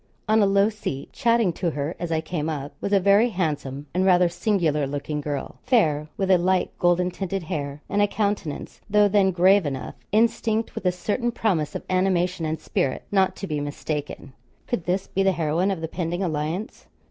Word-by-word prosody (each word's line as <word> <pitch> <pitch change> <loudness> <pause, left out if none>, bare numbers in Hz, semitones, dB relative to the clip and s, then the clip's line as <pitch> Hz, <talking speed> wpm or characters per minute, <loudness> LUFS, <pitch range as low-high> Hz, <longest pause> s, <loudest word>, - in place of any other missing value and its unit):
On 215 +1 +4
a 200 - +4
low 200 +1 +4
seat, 205 -11 -6
chatting 230 -6 +2
to 175 +1 -1
her 150 +2 -3
as 170 -1 -4
I 160 -1 +1
came 160 -1 -3
up, 145 -2 -4
was 200 - -2
a 200 - +5
very 200 +5 +4
handsome 145 - -3
and 185 +2 +1
rather 180 -2 +5
singular 170 -7 0
looking 145 +2 -3
girl, 145 -2 -4
fair, 155 - +2
with 195 -1 +1
a 185 - +6
light 185 +1 +1
golden 180 +1 +2
tinted 190 0 -3
hair; 145 -2 -4
and 205 - +1
a 205 - +4
countenance, 200 -8 -3
though 210 0 +5
then 200 -1 +3
grave 190 +2 +4
enough, 135 -3 -4 0.2
instinct 225 0 +1
with 185 - -3
a - - +4
certain 215 +7 -1
promise 190 -10 0
of - - -4
animation 185 -2 +1
and 155 +1 -2
spirit 130 - -1
not 190 -2 +2
to - - -5
be 155 -5 -2
mistaken. 145 -1 -5 0.3
Could 215 -9 -3
this 185 +2 0
be 195 - -2
the 195 -1 +3
heroine 165 +3 0
of 190 -4 -2
the 160 - -2
pending 175 +2 -3
alliance? 165 +5 -3
180 Hz, 195 wpm, -24 LUFS, 155-200 Hz, 0.3 s, a